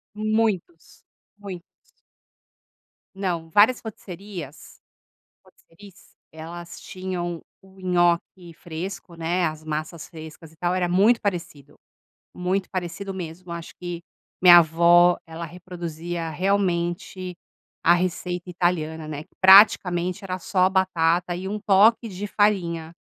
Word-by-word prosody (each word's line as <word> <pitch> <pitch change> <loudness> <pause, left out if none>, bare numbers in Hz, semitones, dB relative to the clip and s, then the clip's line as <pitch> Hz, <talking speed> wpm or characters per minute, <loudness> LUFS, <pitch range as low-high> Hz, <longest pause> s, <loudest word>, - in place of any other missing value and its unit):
Muitos, 215 - -2 0.3
muitos. 195 -4 -8 1.5
Não, 180 -4 -3
várias 215 +7 +5
rotisserias 190 - -9 0.7
rôtisseries 190 +2 -19 0.2
elas 170 +2 -9
tinham 180 -2 -5 0.2
o 190 0 -19
nhoque 175 -1 0
fresco, 175 +2 -7
né. 170 +2 -1
As 155 0 -5
massas 155 +1 -5
frescas 160 -1 -11
e - - -22
tal. 175 +2 -1
Era 180 -1 0
muito 205 +7 +4
parecido, 170 -7 -5 0.6
muito 185 +2 -2
parecido 185 +2 -5
mesmo. 175 -1 -8
Acho 170 0 -7
que 175 -1 -6 0.4
minha 175 -1 +10
avó, 170 +2 +5
ela 165 +1 -7
reproduzia 170 -1 -6
realmente 180 0 -1 0.5
a 170 - +6
receita 180 0 -2
italiana, 160 -3 -1
né. 150 -1 -6
Que - - -35
praticamente 190 -1 +6
era 185 -1 -4
só 185 0 +2
batata 175 -2 +1
e 185 +2 -5
um 210 +2 -3
toque 220 +4 +4
de 200 0 -6
farinha. 170 -6 0
175 Hz, 115 wpm, -24 LUFS, 170-190 Hz, 1.5 s, minha